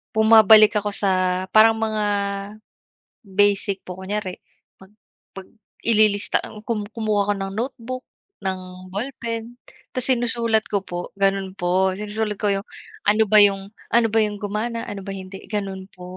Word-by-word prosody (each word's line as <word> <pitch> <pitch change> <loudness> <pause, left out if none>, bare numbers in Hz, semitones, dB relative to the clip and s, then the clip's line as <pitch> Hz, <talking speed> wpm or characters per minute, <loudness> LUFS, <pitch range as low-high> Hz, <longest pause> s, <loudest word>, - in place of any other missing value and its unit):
bumabalik 220 -1 +7
ako 205 0 -3
sa 185 -2 +1
parang 225 +1 +7
mga 215 -1 -1 1.2
basic 200 0 +1
po, 180 0 -8
kunyari 190 -1 -4 0.4
pag 190 +1 -17 0.4
pag 195 -1 -9 0.4
ililista 215 -2 +3
ang 215 0 -9
kum 215 -3 -2
kumuha 215 -3 -1
ako - - +2
ng 195 0 -4
notebook 255 +2 -4 0.4
ng 190 -1 -1 0.3
ballpen 230 0 -5 0.4
tas 255 -1 -2
sinusulat 235 -3 +1
ko 200 -1 -1
po, 175 -2 -6
ganun 195 -1 0
po. 185 +2 +1
Sinusulat 210 +1 -3
ko 210 - +1
yung 195 +2 -4 0.4
ano 215 +1 +5
ba 215 +1 +6
yung 195 0 +1 0.2
ano 230 -1 +4
ba 225 - +3
yung 210 -1 -2
gumana? 225 +3 -3
Ano 200 - -6
ba - - -3
hindi, 190 0 -9
ganun 195 -3 -4
po, 180 - -14
210 Hz, 150 wpm, -22 LUFS, 195-225 Hz, 1.2 s, bumabalik